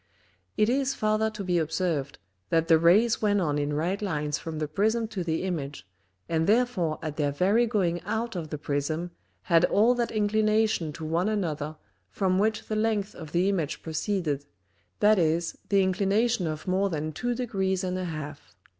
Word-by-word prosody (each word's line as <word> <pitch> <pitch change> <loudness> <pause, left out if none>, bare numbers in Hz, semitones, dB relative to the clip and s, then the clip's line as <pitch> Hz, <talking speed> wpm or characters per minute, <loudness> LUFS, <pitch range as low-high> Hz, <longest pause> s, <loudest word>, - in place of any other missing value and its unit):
It 215 - +4
is 270 +2 +1
farther 215 0 +1
to 210 -2 -6
be 180 -2 +1
observed, 160 -3 -1 0.3
that 165 0 +2
the 165 -2 +6
Rays 205 +8 +4
went 205 -1 +2
on 150 -5 0
in 145 0 -1
right 175 +7 -1
Lines 150 -7 -1
from 160 -1 -6
the 155 0 -2
Prism 220 +8 +1
to 190 -5 -3
the 165 0 -1
Image, 145 - -4 0.4
and 165 -1 0
therefore 205 -9 +2
at 155 -2 -4
their 145 -2 +1
very 200 +11 +2
going 180 -6 0
out 220 +1 -3
of 165 -3 -4
the 150 - -4
Prism 155 +4 -2 0.3
had 170 -2 +4
all 225 +4 +4
that 240 -2 -1
Inclination 215 -4 +1
to 160 - -7
one 170 +6 0
another 155 -7 -2 0.3
from 190 -1 +1
which 215 +1 0
the 215 - -2
length 215 -2 0
of 160 -3 -10
the 175 +3 +2
Image 175 -7 -1
proceeded, 160 -4 -2 0.5
that 210 -1 +5
is, 165 0 +1
the 200 -1 +4
Inclination 200 +2 +1
of 155 +2 -5
more 190 +2 +1
than 155 -2 -3
two 245 +5 -2
degrees 190 -6 -1
and 185 0 -2
an 185 - -3
half. 155 -2 -7
185 Hz, 180 wpm, -27 LUFS, 155-215 Hz, 0.5 s, the